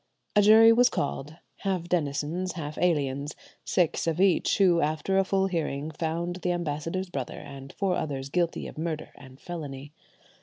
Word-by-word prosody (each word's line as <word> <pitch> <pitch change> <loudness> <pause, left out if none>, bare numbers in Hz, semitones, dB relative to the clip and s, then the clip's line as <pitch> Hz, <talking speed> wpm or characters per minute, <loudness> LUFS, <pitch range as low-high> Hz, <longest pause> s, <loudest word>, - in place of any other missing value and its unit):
A 210 - +7
jury 220 +2 +8
was 245 +2 +5
called, 145 +1 -3 0.2
half 190 -4 -1
denizens, 165 +2 -1
half 155 -3 -5
aliens, 145 -4 0 0.3
six 175 -2 +1
of 165 +1 0
each, 190 -2 +3
who, 180 -4 +4
after 155 +6 +1
a - - +4
full 195 0 +1
hearing, 160 -5 -2
found 170 +3 -3
the 180 -1 -1
ambassador's 170 +3 -3
brother 135 -5 -4
and 135 -1 -9
four 195 -2 0
others 140 -4 -3
guilty 170 +2 0
of - - -8
murder 160 -1 -3
and 130 -1 -14
felony. 145 -5 -7
165 Hz, 160 wpm, -27 LUFS, 145-185 Hz, 0.3 s, jury